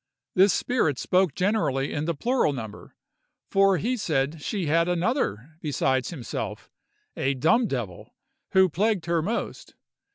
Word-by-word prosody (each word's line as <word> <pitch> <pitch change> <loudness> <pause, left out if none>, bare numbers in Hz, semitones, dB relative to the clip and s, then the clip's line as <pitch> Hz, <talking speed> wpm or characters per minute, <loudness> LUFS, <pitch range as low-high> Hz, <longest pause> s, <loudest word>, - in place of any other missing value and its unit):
This 190 +2 +5
spirit 165 - 0
spoke 180 -2 +1
generally 180 -9 0
in 150 +1 -2
the 170 0 -1
plural 235 - +1
number, 110 -5 -8 0.6
for 195 -1 +4
he 240 +9 -1
said 155 - -1
she 195 +2 -2
had 165 +3 +2
another 170 - -1
besides 135 -3 0
himself, 140 -9 -6 0.4
a 135 +1 0
dumb 160 - +3
devil, 120 - -5 0.4
who 190 0 +6
plagued 190 +1 0
her 170 -1 +1
most. 210 +8 -4
165 Hz, 135 wpm, -25 LUFS, 140-195 Hz, 0.6 s, who